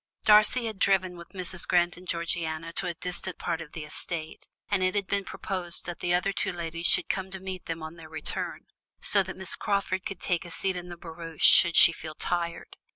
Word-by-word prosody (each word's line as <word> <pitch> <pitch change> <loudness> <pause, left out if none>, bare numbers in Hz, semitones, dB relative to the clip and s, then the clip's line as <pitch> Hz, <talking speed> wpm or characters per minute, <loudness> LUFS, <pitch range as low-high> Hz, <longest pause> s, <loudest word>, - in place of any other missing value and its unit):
Darcy 215 +3 +6
had 220 -3 -4
driven 185 -2 +2
with 170 0 -11
Mrs. 185 -2 -4
Grant 175 -1 +3
and 180 +1 -13
Georgiana 165 -1 -2
to - - -2
a 170 - -3
distant 180 +2 -5
part 165 -2 -2
of 150 - -10
the 160 - -5
estate, 155 +1 -6 0.2
and 200 -2 +1
it 185 +1 +1
had 200 -1 +1
been 200 +1 0
proposed 180 -2 -4
that 175 -1 -5
the 175 - -1
other 180 +3 +2
two - - +1
ladies 170 -1 -2
should - - +4
come 190 0 -2
to 190 0 -7
meet 190 -1 -6
them 165 -1 -4
on 160 +2 -7
their 160 -1 -11
return, 155 -1 -4 0.4
so 200 - +4
that 190 0 -6
Miss 190 -2 -1
Crawford 195 -2 -1
could 195 -3 -5
take 175 -2 0
a 175 - -9
seat 190 +2 -1
in 180 0 -6
the 175 - -8
barouche 165 -1 -2
should 170 -2 +7
she - - +10
feel 155 -2 -8
tired. 170 0 -2
175 Hz, 220 wpm, -28 LUFS, 165-190 Hz, 0.4 s, she